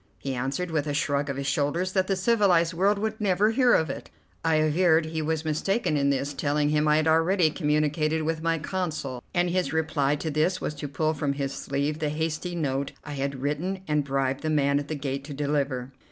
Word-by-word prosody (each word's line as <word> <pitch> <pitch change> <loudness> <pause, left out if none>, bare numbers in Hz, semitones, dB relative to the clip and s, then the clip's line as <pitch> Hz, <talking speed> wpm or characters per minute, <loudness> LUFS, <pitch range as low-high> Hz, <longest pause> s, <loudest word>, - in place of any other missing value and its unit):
He 135 - -4
answered, 135 +8 -2
with 155 -2 0
a 145 - -1
shrug 145 -1 0
of 135 - -3
his 140 - -3
shoulders, 145 +6 0
that 185 -1 +1
the 195 - +1
civilized 185 -5 +3
world 195 +4 +2
would 220 +1 -3
never 205 +2 +3
hear 245 +1 +4
of 160 - +2
it. - - -8 0.3
I 165 -1 +2
averred 160 +1 +3
he 160 0 -3
was 160 0 -1
mistaken 165 +3 0
in 140 -1 +2
this, 140 +1 -1
telling 145 +1 0
him 150 0 +2
I 150 - +5
had 155 +1 +1
already 165 +1 +3
communicated 155 0 0
with 160 0 -1
my 165 0 +1
Consul, 155 -7 -3
and 175 0 +1
his 180 -6 0
reply 150 -3 +1
to 155 +1 -3
this 155 +5 +1
was - - -3
to 145 0 -6
pull 155 +3 0
from 145 -2 -1
his 140 -1 -3
sleeve 140 +2 -2
the 155 -2 0
hasty 160 +3 -2
note 140 -4 -2
I 150 - -8
had 140 -1 -3
written 175 +7 -2
and 150 -1 +1
bribed 135 -1 -1
the 155 - -2
man 140 -2 +2
at 145 - -6
the 155 - -3
gate 140 -1 -3
to 145 -1 -7
deliver. 140 -3 -1
155 Hz, 220 wpm, -26 LUFS, 140-165 Hz, 0.3 s, I